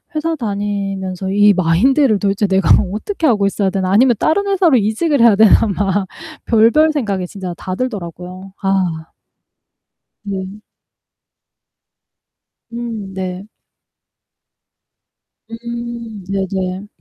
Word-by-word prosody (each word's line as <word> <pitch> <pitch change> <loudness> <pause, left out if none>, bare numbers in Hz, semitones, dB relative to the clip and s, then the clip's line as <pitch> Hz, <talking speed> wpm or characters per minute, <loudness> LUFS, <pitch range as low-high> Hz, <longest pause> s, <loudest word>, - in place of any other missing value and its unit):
회사 325 +1 -1
다니면서 200 - -3
이 205 0 +5
마인드를 215 - +3
도대체 200 0 0
내가 190 0 +1 0.2
어떻게 320 - -2
하고 205 -5 +2
있어야 200 0 0
되나 190 -1 -2
아니면 240 +3 +4
다른 400 +6 +1
회사로 360 -9 +3
이직을 235 +8 0
해야 230 -3 +6
되나 220 +1 +5
막 195 -1 -1 0.4
별별 235 +8 +4
생각이 200 -10 -2
진짜 185 -2 -6
다 185 0 -5
들더라고요. 185 -4 -6
아. 180 -5 -1 1.2
음. 195 +1 -6 2.1
음 225 -5 -6
네. 185 +1 -5 2.0
음 235 -2 -7
네네. 190 0 -3
205 Hz, 220 characters per minute, -17 LUFS, 190-235 Hz, 2.1 s, 해야